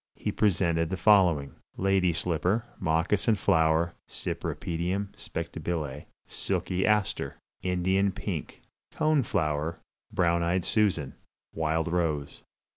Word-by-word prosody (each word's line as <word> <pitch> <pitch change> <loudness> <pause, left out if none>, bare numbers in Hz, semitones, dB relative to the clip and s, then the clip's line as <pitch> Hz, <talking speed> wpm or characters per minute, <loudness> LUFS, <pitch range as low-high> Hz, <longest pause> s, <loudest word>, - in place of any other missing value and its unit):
He - - -2
presented 85 -5 +2
the 95 - -2
following: 90 -8 +4 0.2
Lady 95 -2 +3
Slipper 90 +6 0
(Moccasin 90 +7 +2
Flower 85 -3 +2 0.2
Cypripedium 90 +4 -3
Spectabile). 75 -5 -4 0.2
Silky 95 +1 -1
Aster. 105 -2 +1 0.3
Indian 95 +2 +1
Pink. 90 -6 -5 0.3
Cone 155 -2 +2
Flower 80 - -1 0.3
(Brown 85 0 +2
eyed 85 +1 0
Susan). 95 -11 +1 0.4
Wild 80 0 0
Rose. 80 -4 -1
85 Hz, 100 wpm, -28 LUFS, 80-95 Hz, 0.4 s, following